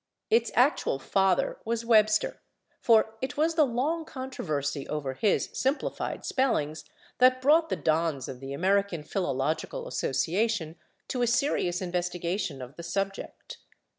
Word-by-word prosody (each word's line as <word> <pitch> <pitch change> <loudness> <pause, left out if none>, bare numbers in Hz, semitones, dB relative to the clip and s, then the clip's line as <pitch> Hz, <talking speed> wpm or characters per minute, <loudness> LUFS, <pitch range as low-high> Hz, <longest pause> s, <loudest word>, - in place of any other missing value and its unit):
Its 230 +1 +3
actual 250 - +3
father 190 +7 +1
was 230 +1 -2
Webster, 215 -2 +3 0.4
for 220 -1 +4
it 260 0 -4
was 320 +2 +2
the 310 -3 +4
long 285 +8 -1
controversy 155 - -4
over 140 -3 -3
his 205 +9 +1
simplified 270 +3 -2
spellings 155 - 0 0.3
that 255 0 +5
brought 315 +5 +4
the - - 0
dons 155 -4 0
of 130 -2 -7
the 135 +1 -7
American 185 +1 +1
Philological 160 - -2
Association 195 - -1 0.3
to 250 - -2
a 240 - +3
serious 235 -8 +1
investigation 175 -4 -2
of 125 +4 -12
the - - -6
subject. 195 +3 -4
195 Hz, 135 wpm, -28 LUFS, 160-250 Hz, 0.4 s, that